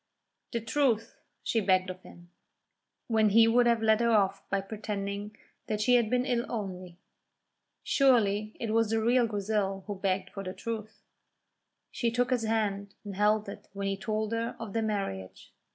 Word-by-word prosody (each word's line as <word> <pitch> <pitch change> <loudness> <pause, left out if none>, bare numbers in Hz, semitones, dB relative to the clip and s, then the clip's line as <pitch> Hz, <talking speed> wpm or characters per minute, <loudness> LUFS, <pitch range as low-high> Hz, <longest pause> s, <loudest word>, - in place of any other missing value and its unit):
"The 235 - -2
truth," 230 -1 0 0.2
she 225 - +1
begged 185 -1 +2
of 185 0 -11
him, 175 -1 -15 0.7
when 220 -2 +3
he 225 +2 +6
would 240 +1 +4
have 230 -1 +2
led 220 0 +4
her 235 - +3
off 200 -3 +2
by 195 - +1
pretending 205 0 -5 0.3
that 215 -1 -1
she 220 +4 +3
had 235 -3 +4
been 250 +1 +1
ill 245 -3 +1
only. 185 -5 -5 0.9
Surely 215 -6 +3
it 225 -2 -2
was 225 -1 +3
the 225 0 +1
real 240 +2 +3
Grizel 200 -2 -1
who 205 - -4
begged 190 -1 -1
for 195 - -6
the 185 -1 -5
truth. 220 -1 -6 0.9
She 235 - 0
took 245 +2 0
his 245 -3 +1
hand 205 -3 -1
and 200 -2 -6
held 210 +1 +2
it 200 - -9
when 200 0 -4
he 195 0 0
told 215 +2 -2
her 230 0 -2
of 225 -4 -6
their 225 - +1
marriage. 195 - -4
215 Hz, 175 wpm, -29 LUFS, 195-230 Hz, 0.9 s, he